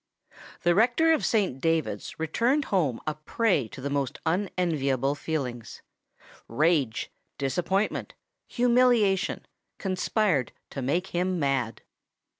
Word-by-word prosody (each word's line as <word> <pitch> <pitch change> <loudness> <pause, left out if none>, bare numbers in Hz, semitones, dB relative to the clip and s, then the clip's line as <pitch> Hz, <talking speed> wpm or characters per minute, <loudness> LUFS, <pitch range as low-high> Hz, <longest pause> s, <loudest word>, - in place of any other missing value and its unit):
The 175 - +4
rector 245 - +4
of 315 - 0
Saint 190 - +1
David's 160 -12 -1
returned 235 - +1
home 150 -11 +1
a 155 - -1
prey 155 - 0
to 130 - -10
the 140 - -3
most 140 -3 -1
unenviable 160 -7 0
feelings. 135 -6 -4 0.6
Rage—disappointment—humiliation 190 - 0 0.3
conspired 185 - 0 0.2
to 135 - -4
make 170 +9 0
him 180 +1 -1
mad. 135 -5 -1
165 Hz, 95 wpm, -27 LUFS, 135-200 Hz, 0.6 s, The